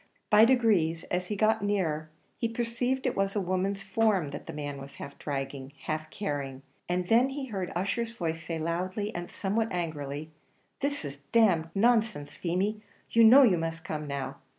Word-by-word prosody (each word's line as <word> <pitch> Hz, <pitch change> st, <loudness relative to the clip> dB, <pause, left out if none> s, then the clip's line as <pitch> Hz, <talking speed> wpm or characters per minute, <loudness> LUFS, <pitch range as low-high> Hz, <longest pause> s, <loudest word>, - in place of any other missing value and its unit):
By 215 Hz, +1 st, +8 dB
degrees, 205 Hz, -10 st, +3 dB
as 180 Hz, 0 st, 0 dB
he 210 Hz, -, -2 dB
got 215 Hz, +1 st, +3 dB
nearer, 165 Hz, -7 st, 0 dB, 0.3 s
he 230 Hz, -, 0 dB
perceived 240 Hz, +3 st, -1 dB
it -, -, +1 dB
was 195 Hz, +1 st, 0 dB
a -, -, +2 dB
woman's 190 Hz, +1 st, -1 dB
form 195 Hz, -6 st, +1 dB
that 145 Hz, -, -8 dB
the -, -, -4 dB
man 145 Hz, -2 st, -5 dB
was 135 Hz, 0 st, -10 dB
half 140 Hz, -, -8 dB
dragging, 135 Hz, -1 st, -4 dB
half 155 Hz, 0 st, -3 dB
carrying, 140 Hz, -9 st, -4 dB, 0.3 s
and 180 Hz, 0 st, 0 dB
then 240 Hz, +5 st, +5 dB
he 275 Hz, 0 st, -4 dB
heard 190 Hz, -4 st, -3 dB
Ussher's 210 Hz, +6 st, -1 dB
voice 165 Hz, -6 st, -3 dB
say 165 Hz, 0 st, -3 dB
loudly, 185 Hz, +6 st, -2 dB
and 175 Hz, 0 st, -5 dB
somewhat 215 Hz, +3 st, -1 dB
angrily, 155 Hz, -3 st, -4 dB, 0.5 s
"This 285 Hz, -, -1 dB
is 140 Hz, 0 st, -6 dB
d 230 Hz, -1 st, +6 dB
d 165 Hz, -6 st, +2 dB
nonsense, 220 Hz, -8 st, +2 dB
Feemy! 195 Hz, +5 st, -1 dB, 0.3 s
you 230 Hz, -, +6 dB
know 255 Hz, +5 st, +9 dB
you 190 Hz, -9 st, +4 dB
must 165 Hz, 0 st, -4 dB
come 150 Hz, -1 st, -4 dB
now." 140 Hz, -1 st, -4 dB
180 Hz, 180 wpm, -29 LUFS, 155-220 Hz, 0.5 s, know